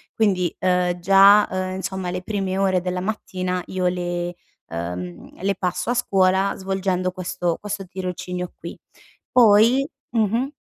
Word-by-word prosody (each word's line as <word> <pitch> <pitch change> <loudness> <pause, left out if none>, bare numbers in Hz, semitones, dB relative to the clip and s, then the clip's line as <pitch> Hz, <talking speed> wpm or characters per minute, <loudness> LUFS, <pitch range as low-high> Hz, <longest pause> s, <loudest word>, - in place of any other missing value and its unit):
Quindi, 185 -6 +1
uhm, 180 -1 +1
già, 195 +3 +6
uhm, 185 0 -3
insomma 190 -1 -4
le 180 0 -4
prime 195 -2 -2
ore 190 -2 +2
della 180 0 -3
mattina 185 -3 -3
io 185 -1 -2
le, 175 -1 -1 0.4
uhm, 90 +1 -6
le 200 0 +1
passo 180 +4 -2
a - - +2
scuola 190 -3 +2
svolgendo 190 -1 -1
questo 180 -2 -2
questo 205 -2 -4
tirocinio 180 -1 -5
qui. - - -7 0.6
Poi 235 +4 +5 0.2
mh-mh. 230 +3 +1
185 Hz, 135 wpm, -22 LUFS, 180-195 Hz, 0.6 s, già